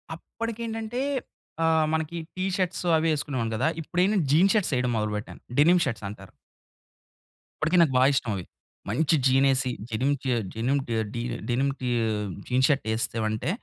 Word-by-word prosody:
అప్పడికి 230 +6 -6
ఏంటంటే 225 +2 -3 0.6
ఆహ్, 160 -1 +3
మనకి 160 +1 -2 0.2
టీషర్ట్స్ 185 -1 -1
అవి 160 +1 +1
వేసుకునేవాడిని 130 -6 -2
కదా! 120 +8 +1
ఇప్పుడేంటి 180 +6 +1
జీన్స్ 180 +7 +5
షర్ట్స్ 195 -9 +1
ఎయడం 125 0 0
మొదలుపెట్టాను 105 0 -3 0.2
డెనిమ్ 170 +4 +5
షర్ట్స్ 115 -5 -3
అంటారు. 95 -2 -11 1.3
ఇప్పటికి 165 +4 +2
నాకు 155 -6 +3
బాగా 130 +1 +6
ఇష్టం 125 -4 0
అవి. 90 - -4 0.5
మంచి 155 +9 +2
జీన్ 135 +1 +4
ఏసి 130 -1 +1 0.2
జెనిమ్ 125 +6 +1
జె 130 -2 +1 0.2
జెనిమ్ 125 +5 0
డె 115 - -1 0.2
డి 115 - -2 0.3
డెనిమ్‌కి 135 +1 0 0.6
జీన్స్ 130 +1 +3
షర్ట్ 140 -6 +1
ఎస్తివంటే 110 +2 -1
140 Hz, 145 wpm, -26 LUFS, 120-170 Hz, 1.3 s, బాగా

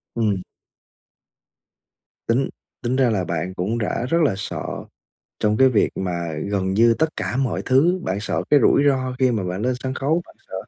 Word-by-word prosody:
Ừm. 105 -5 0 1.9
Tính 120 +4 +2 0.3
tính 125 +1 0
ra 130 -3 +3
là 100 -4 0
bạn 85 +2 -3
cũng 100 +6 -2
rã 115 +1 -1
rất 165 - +2
là 135 - +2
sợ 100 - -5 0.8
trong 105 0 +2
cái 130 +3 +6
việc 115 -5 +2
mà 85 -3 -3 0.2
gần 95 -2 0
như 115 +2 +5
tất 160 +6 +1
cả 95 +6 -2
mọi 135 -1 -1
thứ, 165 +8 +3
bạn 95 +2 -2
sợ 105 - -2
cái 145 - +6
rủi - - +4
ro 130 -2 0
khi 130 -1 +3
mà 110 -5 -1
bạn 90 +3 -3
lên 125 +2 +1
sân 130 0 -3
khấu, 155 +5 0
bạn - - -17
sợ - - -9
115 Hz, 190 wpm, -22 LUFS, 95-130 Hz, 1.9 s, cái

